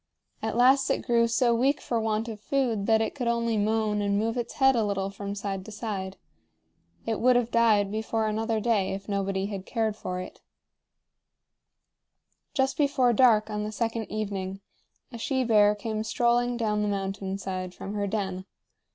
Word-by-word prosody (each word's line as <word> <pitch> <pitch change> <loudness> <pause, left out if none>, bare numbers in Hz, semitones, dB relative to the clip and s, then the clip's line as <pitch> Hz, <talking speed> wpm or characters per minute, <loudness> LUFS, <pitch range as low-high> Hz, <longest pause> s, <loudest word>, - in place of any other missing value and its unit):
At 220 +1 -2
last 265 +2 +5
it - - 0
grew 235 -2 +3
so 235 +1 +2
weak 265 +5 +2
for 235 - -2
want 220 0 -1
of 220 -2 -6
food 230 -4 -1
that 220 -1 +4
it 220 - -1
could 250 -4 -3
only 235 -1 +1
moan 215 0 +1
and 200 0 +1
move 225 +2 0
its 240 -2 -3
head 265 -1 +4
a 230 - +2
little 195 -1 -1
from 200 0 -6
side 195 -2 -4
to 220 - -9
side. 200 -3 -5 0.9
It 225 -1 -1
would 250 +1 +4
have 240 -1 +1
died 215 -4 +3
before 220 +1 -1
another 220 +1 -1
day 210 -4 +1
if 195 +1 -7
nobody 195 -1 -1
had 195 -2 -6
cared 220 -3 -1
for 180 -3 -5
it. 185 - -9 2.1
Just 265 -1 +1
before 275 -4 +3
dark 220 -3 +4
on 210 0 -2
the 210 - -4
second 225 0 -3
evening, 195 -2 -4 0.5
a 235 - -8
she 260 +2 0
bear 210 -3 +4
came 215 +1 -3
strolling 240 +1 +1
down 210 -3 0
the 210 - 0
mountain 195 -1 -3
side 185 -2 -5
from 195 - -6
her 205 -1 -1
den. 190 -3 -3
220 Hz, 180 wpm, -27 LUFS, 200-235 Hz, 2.1 s, last